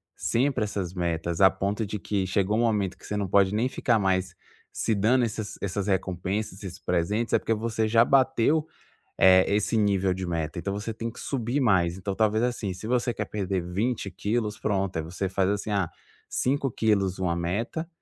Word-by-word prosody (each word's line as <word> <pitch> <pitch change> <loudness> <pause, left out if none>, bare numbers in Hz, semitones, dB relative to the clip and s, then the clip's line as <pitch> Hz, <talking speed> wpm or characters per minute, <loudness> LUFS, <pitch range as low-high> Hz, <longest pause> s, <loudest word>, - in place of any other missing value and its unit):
sempre 130 -1 0
essas 95 -4 -3
metas. 85 -1 -2
A 95 - +8
ponto 100 +3 -2
de 105 0 -4
que 100 -2 -1
chegou 100 +3 +1
um - - +2
momento 105 -5 0
que - - -16
você 105 - -4
não 100 -2 -1
pode 100 +1 +3
nem 120 +4 +1
ficar 120 -3 +1
mais 95 -1 0 0.4
se 110 - 0
dando 120 +5 +3
essas 110 -1 -5
essas 100 0 -2
recompensas, 95 +2 -2
esses 95 0 -7
presentes. 100 +7 -1
É - - +5
porque 115 - 0
você 110 0 -1
já 115 +2 +5
bateu, 135 +3 +3 0.5
eh, 95 0 +6
esse 105 +2 +1
nível 100 -3 +2
de 95 0 -4
meta. 85 0 -2
Então, 100 +2 -3
você 105 +2 -4
tem 115 +1 -4
que - - -13
subir 125 +1 -2
mais. 90 -7 +2
Então, 95 0 -4
talvez 110 +1 +2
assim, 115 -6 -1
se 90 +4 -9
você 120 0 +1
quer - - -3
perder 95 -3 -2
20 100 +4 -2
quilos, 105 0 -2
pronto, 95 -3 -1
aí 80 - 0
você 90 +4 -3
faz 95 0 +1
assim: 105 +1 -2
"Ah, 95 -5 0 0.4
5 135 +1 0
quilos, 100 -5 +1
uma 85 -2 0
meta. 110 - -2
100 Hz, 195 wpm, -26 LUFS, 95-115 Hz, 0.5 s, A